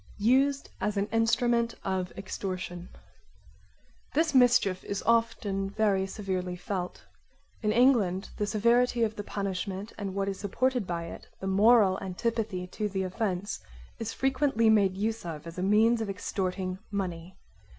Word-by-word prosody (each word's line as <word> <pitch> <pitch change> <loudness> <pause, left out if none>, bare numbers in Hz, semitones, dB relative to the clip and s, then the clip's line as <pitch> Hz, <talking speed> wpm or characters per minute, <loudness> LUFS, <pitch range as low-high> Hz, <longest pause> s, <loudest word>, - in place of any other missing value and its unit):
Used 270 +6 +2
as 210 -1 -1
an 200 - +2
instrument 230 +1 +2
of 185 -1 -2
extortion 185 -2 -5 1.3
This 315 0 +2
mischief 245 -7 +4
is 200 - -4
often 225 -4 +1
very 200 -2 +1
severely 185 -3 -3
felt. 180 0 -5 0.6
In 215 -2 +1
England 215 -6 +3
the 210 - -1
severity 235 +3 +3
of 220 -1 0
the 205 - -5
punishment 195 +1 -4
and 195 -2 -4
what 195 0 0
is 195 -1 -3
supported 245 +2 0
by 170 -1 -2
it, 165 - -9
the - - -6
moral 200 0 +5
antipathy 195 0 -2
to 210 +3 -3
the 190 -1 -2
offence, 190 0 -2 0.4
is 225 -1 -3
frequently 265 -3 +2
made 195 -3 +3
use 220 +2 -1
of 160 -3 -6
as 165 +1 -7
a - - -1
means 220 +4 +4
of 220 - -3
extorting 185 -1 -3
money. 185 -3 -4
200 Hz, 145 wpm, -29 LUFS, 185-230 Hz, 1.3 s, moral